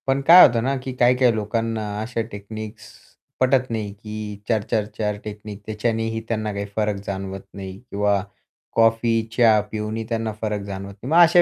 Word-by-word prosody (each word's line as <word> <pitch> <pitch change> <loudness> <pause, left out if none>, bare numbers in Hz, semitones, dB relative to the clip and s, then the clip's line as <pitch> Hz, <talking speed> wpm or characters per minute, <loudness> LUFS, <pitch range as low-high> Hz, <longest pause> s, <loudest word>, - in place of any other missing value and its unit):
पण 135 +1 +2
काय 180 +2 +11
होतं 115 -2 +2
ना 135 +2 +1
की 130 - -4
काही-काही 125 0 +5
लोकांना 115 +1 -1 0.2
अशा 115 +1 -2
टेक्निक्स 110 +2 -8 0.5
पटत 130 0 +3
नाही, 110 -3 -2
की 105 0 -7
4-4-4 105 -1 -1
टेक्नीक, 105 -1 -8
त्याच्यानेही 115 +1 -1
त्यांना 110 -2 -1
काही 100 0 -3
फरक 105 -1 +1
जाणवत 95 0 -4
नाही 95 -1 -7
किंवा 100 0 +2 0.5
कॉफी, 115 0 +3 0.2
चहा 115 -3 +6
पिऊनही 110 +1 -3
त्यांना 115 -1 -1
फरक 105 -2 -1
जाणवत 100 0 -6
नाही. 130 - -4
मग 165 - +5
अशा 170 +1 +6
110 Hz, 160 wpm, -23 LUFS, 105-115 Hz, 0.5 s, काय